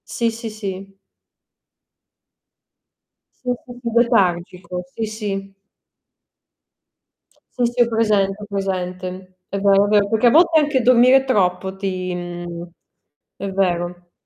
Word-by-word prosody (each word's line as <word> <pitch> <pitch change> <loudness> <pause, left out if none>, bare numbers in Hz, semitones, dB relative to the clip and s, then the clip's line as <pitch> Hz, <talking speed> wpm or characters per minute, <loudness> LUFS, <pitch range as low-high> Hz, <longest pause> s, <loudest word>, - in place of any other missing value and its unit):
Sì, 235 -1 0
sì, 225 0 -6
sì. 195 -2 -7 2.5
Sì, 250 - -1
sì, 245 -1 -11 0.2
letargico. 180 -6 +1
Sì, 225 - -2
sì. 200 -3 -5 2.0
Sì, 245 - +2
sì, 240 +1 0
ho 240 - +5
presente, 210 -3 +1
ho - - -6
presente. 185 -1 -4
È 200 - -3
vero, 200 0 +4
è - - -1
vero, 205 -1 +3
perché 220 +3 +2
a - - +8
volte 330 +5 +5
anche 290 -3 +1
dormire 255 +2 +5
troppo 190 -5 0
ti, 185 -2 -3
mhmm 175 -1 -7 0.7
è 200 - -4
vero. 175 -2 -2
195 Hz, 120 wpm, -20 LUFS, 185-230 Hz, 2.5 s, a